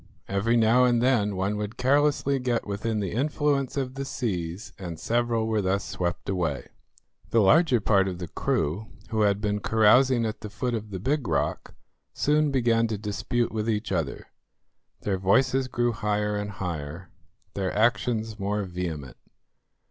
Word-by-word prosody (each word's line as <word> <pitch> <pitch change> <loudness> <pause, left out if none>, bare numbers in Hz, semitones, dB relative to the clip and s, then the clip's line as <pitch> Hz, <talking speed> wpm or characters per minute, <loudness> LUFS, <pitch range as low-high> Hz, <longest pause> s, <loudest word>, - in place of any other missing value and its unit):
Every 110 +5 +1
now 115 +2 +5
and 120 -1 +3
then 115 -5 +2
one 95 +3 -1
would 105 +3 -5
carelessly 140 +1 +2
get 125 -2 -1
within 105 +2 -2
the 95 -3 -2
influence 140 +1 0
of 130 -2 -2
the 135 +1 -4
seas, 95 -9 -4
and 85 -4 -6
several 115 +2 0
were 110 -1 0
thus 100 +1 0
swept 85 -1 -3
away. 85 -8 -2 0.6
The 115 - +3
larger 130 - +5
part 100 -2 +3
of 90 -2 -4
the 90 -1 -6
crew 85 +6 -1 0.2
who 110 -1 +1
had 100 -1 +3
been 105 -1 -1
carousing 115 +3 +4
at 110 - -4
the 105 - -6
foot 120 +4 -3
of 110 -2 -4
the 95 -2 -5
big 135 +3 -1
rock, 80 - -2 0.4
soon 150 +1 +2
began 115 -4 +2
to 110 -2 -3
dispute 110 +3 -2
with 110 0 -2
each 105 -1 -1
other; 80 -7 -2 0.8
their 95 -2 -1
voices 130 +7 +2
grew 120 -1 0
higher 105 -1 -1
and 105 0 -3
higher, 85 -3 -6 0.4
their 95 -2 -2
actions 110 -1 0
more 105 +1 -1
vehement. 85 -7 -5
105 Hz, 165 wpm, -26 LUFS, 95-120 Hz, 0.8 s, now